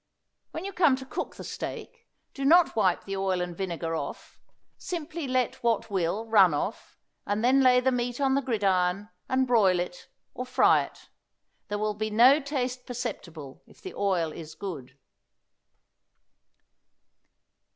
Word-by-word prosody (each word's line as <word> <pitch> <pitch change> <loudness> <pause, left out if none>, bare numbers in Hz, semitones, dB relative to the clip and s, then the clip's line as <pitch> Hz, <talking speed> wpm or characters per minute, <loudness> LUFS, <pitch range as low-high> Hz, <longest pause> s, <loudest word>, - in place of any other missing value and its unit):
When 325 - -6
you 395 - -5
come 330 -7 +4
to 265 0 -9
cook - - -5
the - - -9
steak 470 -1 -7 0.3
do 275 - -6
not 335 +4 +5
wipe 190 -5 +2
the 195 - -4
oil 190 -1 0
and 175 -1 -4
vinegar 170 -3 -3
off; - - -7 0.4
simply 335 -3 -5
let 255 -2 -1
what 230 -3 0
will 190 +3 -1
run 195 -8 +5
off, 195 +9 -5 0.3
and 205 +3 0
then 265 +2 +5
lay 250 -1 +5
the 260 +1 +2
meat 245 0 -2
on 270 -1 +2
the 275 - +2
gridiron 200 -5 0 0.2
and 260 0 +2
broil 205 -8 +3
it, 180 0 -6 0.2
or 250 - -4
fry 250 - +4
it; - - -17 0.6
there 205 - -3
will 210 0 -1
be 215 +1 -3
no 245 +7 +6
taste 255 -3 -3
perceptible 185 - -6
if - - -20
the 380 - -8
oil 180 -5 0
is 160 -1 -9
good. 140 -9 -7
220 Hz, 155 wpm, -27 LUFS, 185-260 Hz, 0.6 s, no